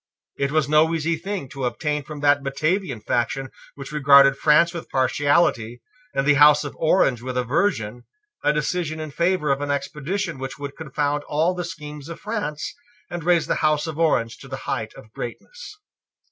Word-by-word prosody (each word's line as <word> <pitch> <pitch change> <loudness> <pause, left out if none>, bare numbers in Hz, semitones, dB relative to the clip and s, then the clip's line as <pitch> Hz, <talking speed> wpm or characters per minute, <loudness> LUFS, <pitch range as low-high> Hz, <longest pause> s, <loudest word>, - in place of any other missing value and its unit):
It 140 0 -1
was 155 -2 +2
no 155 +2 +4
easy 165 +1 0
thing 190 -2 -5
to 135 -1 -4
obtain 150 +5 -1
from 150 0 -9
that 145 0 +4
Batavian 155 - -1
faction 130 +4 -1 0.2
which 140 0 -9
regarded 140 -2 +6
France 155 +4 +4
with 170 - -7
partiality, 130 -4 +1 0.3
and 135 - +1
the 150 - +5
House 150 +1 +7
of 145 - -7
Orange 155 -7 +3
with 130 0 -4
aversion, 125 - -1 0.4
a 150 - +4
decision 155 +1 -2
in 155 -1 -6
favour 170 -1 +1
of 135 +1 0
an 145 - -3
expedition 150 +4 -3
which 135 0 -6
would 140 0 -7
confound 145 -1 -2
all 160 +5 +1
the 180 0 -4
schemes 150 -4 -8
of 165 - -7
France, 205 -9 -4 0.4
and 175 -2 -5
raise 175 -1 +3
the - - 0
House 155 0 +2
of 160 -1 -6
Orange 120 -8 +1
to - - -12
the - - -5
height - - -3
of 110 0 -15
greatness. 455 - -8
150 Hz, 180 wpm, -23 LUFS, 140-165 Hz, 0.4 s, House